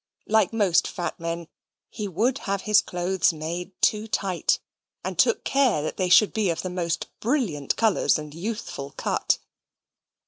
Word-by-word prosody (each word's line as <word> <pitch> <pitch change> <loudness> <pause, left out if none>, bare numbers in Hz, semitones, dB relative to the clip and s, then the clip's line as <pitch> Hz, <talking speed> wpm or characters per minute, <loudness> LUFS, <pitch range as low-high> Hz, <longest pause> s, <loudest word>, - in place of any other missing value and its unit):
Like 220 -3 +3
most 205 -6 +3
fat 175 -1 -4
men, 165 0 -4 0.4
he 210 - -4
would 235 - 0
have 200 -1 0
his 210 0 +5
clothes 180 +1 +1
made 170 +4 -6
too 215 +1 +2
tight, 190 -5 0 0.5
and - - -3
took - - +3
care 245 - +2
they 185 -1 -2
should 205 +4 +6
be 215 -4 +1
of 165 - -2
the 185 - -3
most 170 -2 -2
brilliant 210 - 0
colours 220 -6 +3
and 150 -1 -8
youthful 170 -7 -5
cut. - - +1
185 Hz, 150 wpm, -25 LUFS, 170-215 Hz, 0.5 s, should